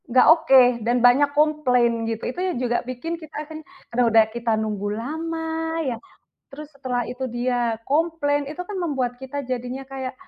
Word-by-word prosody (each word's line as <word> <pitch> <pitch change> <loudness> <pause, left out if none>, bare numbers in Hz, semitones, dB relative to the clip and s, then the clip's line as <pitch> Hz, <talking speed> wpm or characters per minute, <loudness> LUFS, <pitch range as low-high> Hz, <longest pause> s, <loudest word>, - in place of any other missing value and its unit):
Enggak 255 +2 +5
oke, 320 -5 +2 0.3
dan 240 +1 +2
banyak 270 +4 +5
komplain, 250 -7 +2
gitu, 225 0 -4
itu 305 - -9
yang 370 -6 -1
juga 240 -1 0
bikin 255 +7 -4
kita 315 -1 -10
kan, 310 +1 -9 0.3
karena 245 +1 +3
udah 225 0 +6
kita 235 -1 -2
nunggu 210 -2 -2
lama 325 +6 -4 0.4
ya. 255 -3 -1 0.6
Terus, 300 +1 -9
setelah 260 -4 -3
itu 255 +1 -4
dia 240 -1 -1
komplain, 290 0 0
itu 310 +5 -5
kan 395 +3 -7
membuat 265 -8 -2
kita 270 +2 -5
jadinya 255 0 -4
kayak, 265 -1 -6
260 Hz, 170 wpm, -23 LUFS, 240-300 Hz, 0.6 s, udah